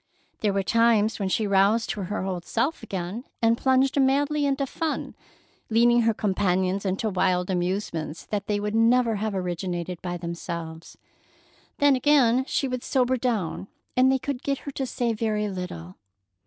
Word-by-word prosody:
There 210 - +1
were 195 0 0
times 230 0 +3
when 195 -2 -1
she 215 +3 +1
roused 200 +3 +3
to 205 - -4
her 205 +1 -3
old 180 -3 -3
self 305 - -1
again, 190 +5 -5 0.2
and 230 0 +3
plunged 265 +2 +2
madly 285 +2 +2
into 275 0 0
fun, 315 +3 -3 0.6
leading 240 +1 +4
her 225 0 +2
companions 190 -1 0
into 195 +4 -1
wild 185 -2 +1
amusements 175 -3 -2
that 205 -1 -3
they 205 -1 0
would 210 +1 -3
never 230 0 +3
have 210 0 -2
originated 180 -1 -3
by 175 -1 -4
themselves. 170 -1 -6 0.8
Then 285 -1 +4
again 260 -2 +3
she 275 - 0
would 255 -1 -4
sober 260 -1 +1
down, 225 -8 -2 0.3
and 255 +1 +5
they 265 - +3
could 270 -1 -4
get 280 -1 -1
her 285 - -4
to 265 -1 -3
say 240 -2 -1
very 215 -1 -1
little. 180 - -6
215 Hz, 165 wpm, -25 LUFS, 185-255 Hz, 0.8 s, and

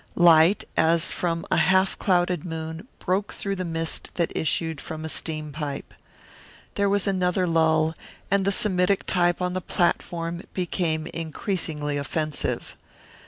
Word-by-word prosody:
Light 170 +2 +6
as 165 +1 +3
from 170 -1 -2
a - - +3
half 190 +1 +3
clouded 180 -3 +1
moon 160 +3 -6
broke 195 +2 -1
through 200 -1 -3
the 185 - -3
mist 165 -1 -2
that 170 -2 -1
issued 160 -1 -1
from 160 0 -6
a - - -4
steam 155 -1 -2
pipe. 145 -2 -5 0.8
There 200 0 +1
was 200 -1 +1
another 185 -1 +1
lull, 160 -1 +2 0.4
and 200 0 +3
the 200 - +2
Semitic 190 -1 +2
type 175 0 +2
on 180 0 -1
the 185 - -2
platform 170 0 -1
became 170 -3 -1
increasingly 160 -3 -3
offensive. 155 +1 -2
170 Hz, 140 wpm, -25 LUFS, 160-185 Hz, 0.8 s, Light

